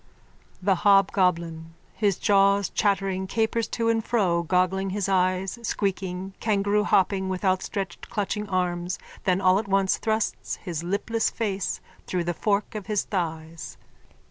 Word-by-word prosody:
THE 195 Hz, -1 st, +3 dB
HOBGOBLIN: 170 Hz, -4 st, +2 dB, 0.3 s
_(His 200 Hz, -3 st, +2 dB
jaws 200 Hz, -1 st, +3 dB
chattering, 195 Hz, -2 st, 0 dB
capers 225 Hz, +2 st, 0 dB
to 230 Hz, 0 st, -2 dB
and 225 Hz, -1 st, +2 dB
fro, 190 Hz, -8 st, +1 dB
goggling 185 Hz, +3 st, +1 dB
his 195 Hz, 0 st, -2 dB
eyes, 185 Hz, +2 st, +1 dB
squeaking, 190 Hz, -3 st, -2 dB
kangaroohopping 200 Hz, -2 st, +2 dB
with 190 Hz, +1 st, -3 dB
outstretched 190 Hz, -1 st, -2 dB
clutching 210 Hz, 0 st, -2 dB
arms, 180 Hz, -1 st, -1 dB, 0.3 s
then 185 Hz, -1 st, +3 dB
all 185 Hz, 0 st, +4 dB
at 210 Hz, -, -5 dB
once 195 Hz, -1 st, +2 dB
thrusts 220 Hz, -1 st, -1 dB
his 170 Hz, -4 st, -5 dB
lipless 210 Hz, +5 st, 0 dB
face 200 Hz, -5 st, -2 dB, 0.3 s
through 180 Hz, -2 st, -1 dB
the 175 Hz, +1 st, -1 dB
fork 200 Hz, +3 st, 0 dB
of 210 Hz, -3 st, -6 dB
his 210 Hz, -2 st, +1 dB
thighs.) 165 Hz, -3 st, -4 dB
195 Hz, 135 wpm, -25 LUFS, 180-205 Hz, 0.3 s, all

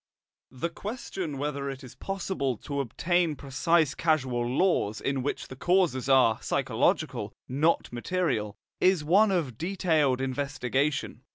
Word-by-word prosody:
The 165 Hz, +6 st, -4 dB
question 190 Hz, -, -5 dB
whether 140 Hz, 0 st, -2 dB
it 135 Hz, 0 st, -7 dB
is 125 Hz, -, -10 dB
possible 185 Hz, -, -2 dB
to 140 Hz, +6 st, -4 dB
obtain 165 Hz, +5 st, 0 dB
precise 145 Hz, +3 st, +1 dB
causal 130 Hz, -7 st, 0 dB
laws 125 Hz, -, +1 dB
in 140 Hz, -1 st, -1 dB
which 140 Hz, -, -3 dB
the 130 Hz, -, -9 dB
causes 170 Hz, -5 st, +1 dB
are 130 Hz, -5 st, +4 dB
psychological, -, -, 0 dB
not 145 Hz, +1 st, +1 dB
material, 120 Hz, -, -1 dB, 0.2 s
is 185 Hz, -4 st, +3 dB
one 195 Hz, +8 st, +5 dB
of 155 Hz, -, -1 dB
detailed 160 Hz, -7 st, +1 dB
investigation. 135 Hz, 0 st, -1 dB
145 Hz, 125 wpm, -28 LUFS, 130-170 Hz, 0.2 s, one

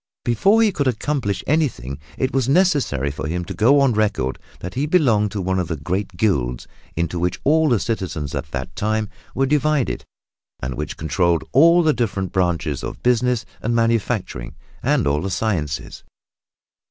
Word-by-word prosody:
Before 195 Hz, -, +4 dB
he 215 Hz, -, +3 dB
could 145 Hz, -6 st, -1 dB
accomplish 125 Hz, -4 st, -1 dB
anything 125 Hz, -, -1 dB, 0.2 s
it 130 Hz, 0 st, -1 dB
was 135 Hz, -1 st, +1 dB
necessary 140 Hz, -, +2 dB
for 70 Hz, 0 st, -5 dB
him 90 Hz, +2 st, -2 dB
to -, -, -6 dB
go 130 Hz, +6 st, +4 dB
on 135 Hz, -3 st, +3 dB
record 105 Hz, -12 st, 0 dB, 0.2 s
that 90 Hz, +1 st, -6 dB
he 140 Hz, +4 st, -1 dB
belonged 120 Hz, -12 st, +3 dB
to 100 Hz, -, -2 dB
one 95 Hz, +1 st, 0 dB
of 90 Hz, -, -1 dB
the 85 Hz, -2 st, -3 dB
great 90 Hz, +5 st, -3 dB
guilds 60 Hz, -, 0 dB, 0.3 s
into 85 Hz, +1 st, -1 dB
which 90 Hz, +1 st, -1 dB
all 155 Hz, +2 st, +4 dB
the 120 Hz, -4 st, +3 dB
citizens 90 Hz, -11 st, -3 dB
at -, -, -4 dB
that 70 Hz, -1 st, -5 dB
time 110 Hz, +4 st, -1 dB, 0.3 s
were 135 Hz, -, +2 dB
divided, 150 Hz, -1 st, +1 dB, 0.6 s
and 65 Hz, +1 st, -4 dB
which -, -, -5 dB
controlled 80 Hz, +2 st, +1 dB
all 170 Hz, +6 st, +6 dB
the 155 Hz, -1 st, +4 dB
different 100 Hz, -7 st, -2 dB
branches 85 Hz, -6 st, 0 dB
of -, -, -6 dB
business 125 Hz, -1 st, +2 dB, 0.2 s
and 115 Hz, +2 st, 0 dB
manufacturing, 115 Hz, -, -1 dB, 0.3 s
and -, -, +2 dB
all 70 Hz, +1 st, +1 dB
the 95 Hz, -, -3 dB
sciences. 90 Hz, -7 st, -2 dB
105 Hz, 170 wpm, -21 LUFS, 85-135 Hz, 0.6 s, all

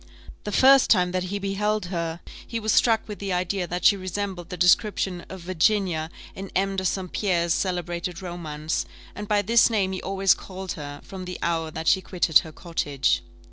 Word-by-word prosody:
The 210 Hz, -, -3 dB
first 265 Hz, +5 st, +6 dB
time 180 Hz, -4 st, +4 dB
that 185 Hz, 0 st, -1 dB
he 200 Hz, +2 st, -3 dB
beheld 205 Hz, +1 st, -1 dB
her, 170 Hz, 0 st, -3 dB, 0.3 s
he 230 Hz, -, -3 dB
was 220 Hz, 0 st, 0 dB
struck 225 Hz, -2 st, +3 dB
with 210 Hz, -2 st, -7 dB
the 200 Hz, -1 st, -3 dB
idea 180 Hz, +1 st, -1 dB
that 180 Hz, +1 st, -4 dB
she 205 Hz, -, +7 dB
resembled 185 Hz, -2 st, -4 dB
the 180 Hz, -, -6 dB
description 180 Hz, 0 st, +2 dB
of 190 Hz, -1 st, -8 dB
Virginia 180 Hz, -2 st, +1 dB, 0.2 s
in 195 Hz, 0 st, -7 dB
M. 195 Hz, +1 st, +1 dB
de 190 Hz, -, -2 dB
St. 185 Hz, -1 st, -2 dB
Pierre's 170 Hz, -5 st, +1 dB
celebrated 175 Hz, -1 st, -2 dB
romance; 160 Hz, -4 st, -4 dB, 0.3 s
and 210 Hz, 0 st, -7 dB
by 205 Hz, -1 st, +2 dB
this 230 Hz, +4 st, +5 dB
name 200 Hz, -4 st, +1 dB
he 185 Hz, -, -4 dB
always 195 Hz, 0 st, +3 dB
called 190 Hz, -1 st, -7 dB
her, 145 Hz, -1 st, -7 dB
from 190 Hz, -1 st, -8 dB
the 180 Hz, 0 st, -6 dB
hour 165 Hz, -1 st, 0 dB
that 160 Hz, +1 st, -6 dB
she 190 Hz, -, +4 dB
quitted 175 Hz, -4 st, +3 dB
her 160 Hz, -, -9 dB
cottage. 145 Hz, -6 st, -1 dB
185 Hz, 190 wpm, -25 LUFS, 170-200 Hz, 0.3 s, she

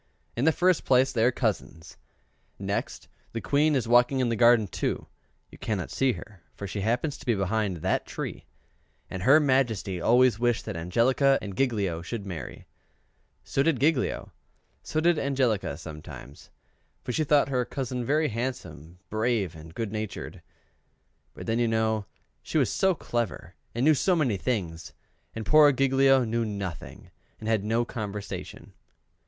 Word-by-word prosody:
In 120 Hz, -, 0 dB
the 160 Hz, -, +6 dB
first 180 Hz, 0 st, +2 dB
place 130 Hz, 0 st, +3 dB
they 115 Hz, -3 st, +1 dB
are 125 Hz, -, +4 dB
cousins; 105 Hz, -9 st, -3 dB, 0.6 s
next, -, -, -4 dB, 0.3 s
the 115 Hz, -, -2 dB
Queen 145 Hz, +4 st, +2 dB
is 125 Hz, -4 st, 0 dB
walking 120 Hz, +3 st, +4 dB
in 125 Hz, -2 st, +1 dB
the 115 Hz, -, 0 dB
garden 115 Hz, -1 st, +5 dB
too 90 Hz, -, -3 dB, 0.5 s
(you -, -, -14 dB
cannot 100 Hz, -4 st, -3 dB
see 135 Hz, -2 st, +2 dB
her, 95 Hz, +1 st, -11 dB
for 100 Hz, -, -6 dB
she 100 Hz, +1 st, -4 dB
happens 125 Hz, +8 st, -1 dB
to -, -, -13 dB
be 120 Hz, -, +3 dB
behind 100 Hz, -1 st, -1 dB
that -, -, -1 dB
tree), -, -, -6 dB, 0.6 s
and 95 Hz, -, -5 dB
her 140 Hz, +10 st, +6 dB
Majesty 120 Hz, -, +1 dB
always 120 Hz, +2 st, +4 dB
wished 120 Hz, -1 st, +1 dB
that -, -, -5 dB
Angelica 120 Hz, -, +2 dB
and 100 Hz, -2 st, -7 dB
Giglio 100 Hz, -10 st, 0 dB
would 115 Hz, -4 st, -4 dB
marry: 90 Hz, -5 st, -7 dB, 0.8 s
so 135 Hz, -, 0 dB
did 150 Hz, -3 st, +2 dB
Giglio: 145 Hz, 0 st, 0 dB, 0.5 s
so 155 Hz, -, -2 dB
did 170 Hz, -1 st, +3 dB
Angelica 125 Hz, -, 0 dB
sometimes, 75 Hz, -3 st, -10 dB, 0.5 s
for -, -, -3 dB
she 155 Hz, -, 0 dB
thought 145 Hz, -1 st, +3 dB
her 125 Hz, -2 st, +1 dB
cousin 125 Hz, -1 st, -4 dB
very 150 Hz, +5 st, +1 dB
handsome, 90 Hz, -, -5 dB
brave, 110 Hz, -5 st, 0 dB
and 80 Hz, 0 st, -12 dB
good 115 Hz, -3 st, -3 dB
natured; 95 Hz, -5 st, -5 dB, 0.9 s
but -, -, -8 dB
then 115 Hz, +1 st, 0 dB
you 120 Hz, -, +2 dB
know 110 Hz, -2 st, 0 dB, 0.3 s
she -, -, -3 dB
was -, -, +2 dB
so 190 Hz, -2 st, +2 dB
clever 120 Hz, -, -3 dB, 0.2 s
and 120 Hz, +3 st, +1 dB
knew 155 Hz, -, +6 dB
so 180 Hz, +6 st, +2 dB
many 135 Hz, -10 st, +1 dB
things, 90 Hz, -8 st, -3 dB, 0.4 s
and 110 Hz, -1 st, -5 dB
poor 150 Hz, +3 st, +7 dB
Giglio 135 Hz, 0 st, +4 dB
knew 115 Hz, 0 st, -1 dB
nothing, 100 Hz, -6 st, -6 dB, 0.3 s
and 110 Hz, -, -7 dB
had 110 Hz, -3 st, +1 dB
no 115 Hz, +3 st, +1 dB
conversation. 105 Hz, -3 st, -6 dB
115 Hz, 160 wpm, -27 LUFS, 100-135 Hz, 0.9 s, poor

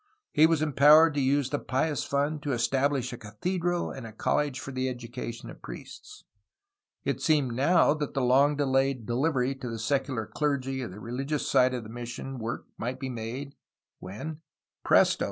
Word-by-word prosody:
He 155 Hz, +1 st, +6 dB
was 160 Hz, -2 st, +1 dB
empowered 150 Hz, +2 st, +6 dB
to 145 Hz, -, 0 dB
use 135 Hz, 0 st, +1 dB
the 145 Hz, -, 0 dB
Pious 145 Hz, +2 st, -1 dB
Fund 145 Hz, +2 st, -1 dB
to 145 Hz, -2 st, -2 dB
establish 130 Hz, +2 st, 0 dB
a -, -, -6 dB
cathedral 175 Hz, -, -2 dB
and 130 Hz, -4 st, -7 dB
a -, -, -9 dB
college 135 Hz, +5 st, 0 dB
for 140 Hz, -, -7 dB
the 130 Hz, 0 st, -1 dB
education 120 Hz, -1 st, -6 dB
of -, -, -14 dB
priests. 425 Hz, 0 st, -10 dB, 0.8 s
It -, -, -2 dB
seemed 145 Hz, -6 st, +2 dB
now 145 Hz, +5 st, +4 dB
that 150 Hz, -2 st, -4 dB
the 135 Hz, -, +1 dB
long 135 Hz, +4 st, +4 dB
delayed 135 Hz, -3 st, +1 dB
delivery 130 Hz, +2 st, +1 dB
to 130 Hz, -2 st, -7 dB
the 115 Hz, -, -4 dB
secular 130 Hz, -1 st, -1 dB
clergy 135 Hz, -1 st, -1 dB
of 120 Hz, -, -4 dB
the 95 Hz, +3 st, -10 dB
religious 135 Hz, +6 st, -3 dB
side 130 Hz, 0 st, +4 dB
of 120 Hz, -, -4 dB
mission 120 Hz, +3 st, -6 dB
work 115 Hz, +1 st, -4 dB
might 125 Hz, +3 st, -3 dB
be 135 Hz, -1 st, -4 dB
made, 125 Hz, +4 st, -5 dB, 0.5 s
when 135 Hz, +12 st, -7 dB, 0.2 s
— -, -, -66 dB
presto! -, -, +4 dB
135 Hz, 175 wpm, -28 LUFS, 120-145 Hz, 0.8 s, He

